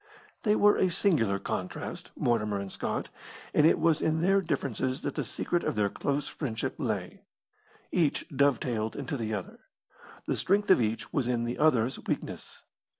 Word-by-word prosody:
They 210 -2 +3
were 205 0 +5
a 185 - +3
singular 160 - +2
contrast, 90 -1 -5
Mortimer 105 -4 +1
and 100 -1 -5
Scott, - - -3 0.4
and 150 - +6
it - - +4
was 165 -2 +2
in 160 0 +1
their 195 +3 +4
differences 135 - -2
that 145 - -2
the - - -2
secret 175 -1 -1
of - - -1
their 105 -1 +2
close 145 +6 -2
friendship 115 -7 -3
lay. - - -3 0.7
Each 165 -5 +1
dovetailed 125 -5 +1
into 140 0 -3
the 110 -4 -2
other. 95 - -7 0.7
The - - 0
strength 205 +1 +2
of 185 - +6
each 110 0 -2
was 135 -5 +1
in 120 -2 0
the 120 +1 -3
other's 130 -5 +3
weakness. - - -4
135 Hz, 165 wpm, -29 LUFS, 110-160 Hz, 0.7 s, and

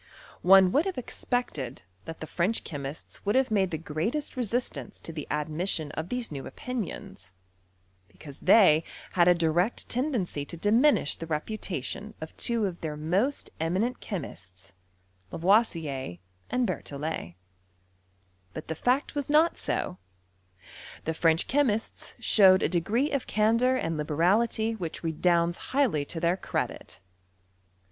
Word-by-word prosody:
One 190 0 +7
would 295 - +3
have 380 - -3
ex. 255 - -6
pected 150 - -2 0.2
that 165 0 -8
the - - -3
French 185 +7 0
chemists 140 -1 -7
would 205 +3 0
have 265 -3 +3
made 195 -3 +2
the 160 - -3
greatest 165 - -3
resistance 240 -3 -2
to 165 - -8
the 155 -2 -6
admission 155 +1 -1
of 160 +3 -5
these 250 -5 -2
new 140 -2 -6
opinions; 230 - -6 0.7
because 145 -3 -12
they 180 -5 +6 0.3
had 175 -1 +4
a 180 - +6
direct 170 +6 +1
tendency 240 - -1
to 170 +4 -8
diminish 225 - +4
the 165 - -7
reputation 195 - -4
of 160 - -8
two 235 -3 0
of 180 -3 -4
their 155 -3 -4
most 190 - -1
eminent 190 +10 0
chemists, 95 - -7 0.6
Lavoisier 165 - +1 0.3
and 250 0 +1
Berthollet. 145 - -4 1.2
But 155 - -7
the - - 0
fact 250 - 0
was 290 0 -3
not 310 +3 +4
so: 90 - -2 1.0
the 160 - -1
French 165 +1 +2
chemists 240 -6 0
showed 190 -3 +6
a - - +2
de~ 175 - +2
gree 235 - 0
of 275 -3 -1
candour 230 +4 +3
and 165 -10 -1
liberality 200 +9 +1
which 175 -8 -5
redounds 170 +1 +1
highly 255 - +2
to 165 - -5
their 170 +2 +1
credit. 90 - -4
180 Hz, 140 wpm, -28 LUFS, 155-230 Hz, 1.2 s, One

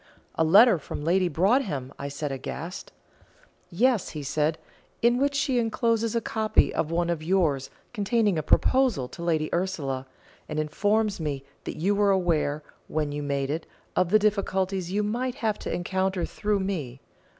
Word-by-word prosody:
"A 160 - +1
letter 200 +4 +6
from 145 - -6
Lady 180 +3 +2
Broadhem?" 170 - +1 0.2
said 140 +1 -4
I, - - -2
aghast. 165 +7 -7 0.8
"Yes," 225 +3 +2
he 150 -2 -6
said, 150 +3 0 0.5
"in 240 +1 +4
which 280 +1 +1
she 275 -3 +1
encloses 230 0 0
a - - +3
copy 220 -2 +1
of 155 - -1
one 170 +1 0
of 165 -2 -2
yours 155 -6 +1 0.2
containing 210 -2 +1
a 155 - 0
proposal 245 - +2
to - - -10
Lady 160 -3 +1
Ursula, 145 -8 -2 0.4
and 155 -1 -2
informs 205 +7 0
me 145 -4 -3 0.2
that - - -5
you 190 +6 +1
were 205 0 +3
aware, 165 -6 +1 0.2
when 150 -1 -1
you 145 0 -3
made 140 -1 -1
it, 160 +2 -4 0.3
of 180 -2 +2
the 215 - +6
difficulties 195 -3 0
you 210 +2 +1
might 245 +4 -2
have 220 -2 -1
to - - -5
encounter 190 0 -1
through 205 -1 -1
me. 155 -10 -3
185 Hz, 165 wpm, -26 LUFS, 155-210 Hz, 0.8 s, letter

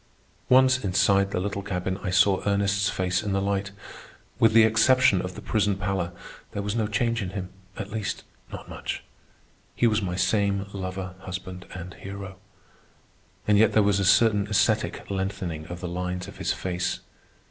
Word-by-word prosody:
Once 130 0 +5
inside 100 +1 +3
the 95 - -2
little 100 +1 -2
cabin, 95 -1 -3
I 95 - -3
saw 95 +1 +4
Ernest's 100 0 +2
face 95 0 0
in 105 -2 -2
the 100 - +2
light. 100 0 -1 0.7
With 115 -1 +5
the 115 0 +8
exception 110 -2 +4
of 90 0 -6
the - - -9
prison 105 -3 +1
pallor, 95 -2 -2 0.4
there 100 - -3
was 105 +2 -2
no 110 -2 +1
change 115 +2 0
in 95 - -3
him—at 95 +1 -8
least, 110 -2 -3 0.3
not - - -8
much. - - -5 0.7
He - - +2
was 110 -1 +3
my 90 -2 -2
same 100 0 +1
lover 95 -1 -5
husband 95 -1 -7
and 90 0 -7
hero. 100 -1 -8 1.1
And 105 -1 +5
yet 110 -1 +5
there 105 - +5
was 100 -1 +2
a - - +1
certain 105 +1 +4
ascetic 105 -1 +1
lengthening 95 -5 -3
of 90 0 -7
the 90 - -3
lines 90 +1 -3
of - - -11
his - - 0
face. 90 0 -2
100 Hz, 170 wpm, -26 LUFS, 95-105 Hz, 1.1 s, the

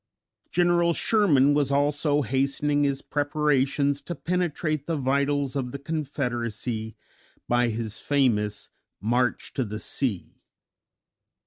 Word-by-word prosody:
General 175 -1 +3
Sherman 155 -11 +3
was 145 -2 +2
also 145 +1 +2
hastening 140 +2 +1
his 140 -1 -1
preparations 145 -1 +1
to 175 - -6
penetrate 155 -3 -2
the 165 - 0
vitals 140 +1 0
of 130 -3 -2
the 140 - -5
Confederacy 120 -7 -3 0.5
by 120 0 +3
his 110 -1 -4
famous 110 -8 0 0.3
"March 120 +3 0
to 130 - 0
the 110 -1 -5
Sea." 115 -9 -2
140 Hz, 110 wpm, -26 LUFS, 125-150 Hz, 0.5 s, General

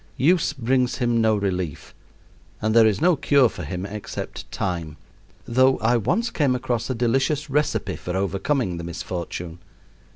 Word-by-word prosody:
Use 165 +6 +3
brings 125 0 +1
him 120 -2 +1
no 110 -1 +3
relief, 95 -6 -3 0.7
and 110 0 0
there 115 -1 +7
is 105 - +1
no 175 +1 +5
cure 140 -2 +4
for 90 - -8
him 90 +4 -4
except 105 +1 -7
time; 85 -4 -3 0.5
though 130 +2 +3
I 115 +2 +2
once 180 - 0
came 140 -5 +1
across 120 -1 -2
a 130 - -1
delicious 135 +5 0
recipe 150 +2 0
for 90 +1 -4
overcoming 100 +1 -1
the 85 - -6
misfortune. 85 0 -5
115 Hz, 155 wpm, -23 LUFS, 95-130 Hz, 0.7 s, there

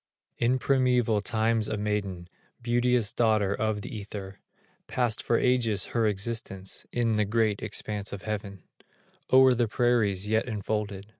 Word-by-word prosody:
In 120 +2 +2
primeval 125 -5 +2
times, 110 +1 +1
a 110 - -2
maiden, 100 -4 -3 0.4
Beauteous 120 -2 +2
Daughter 110 -4 +2
of 110 -1 -2
the 130 - -7
Ether, 100 -2 -7 0.5
Passed 120 -4 0
for 115 - +1
ages 115 -6 +1
her 115 -2 +2
existence 100 -2 -3
In 115 -3 +1
the 105 - +2
great 110 -1 +1
expanse 105 -1 -3
of 100 - -7
heaven, 100 -4 -5 0.7
O'er 130 0 +7
the 120 -1 +1
prairies 110 -4 +1
yet 110 +2 +1
enfolded. 105 -2 -3
110 Hz, 140 wpm, -27 LUFS, 100-120 Hz, 0.7 s, O'er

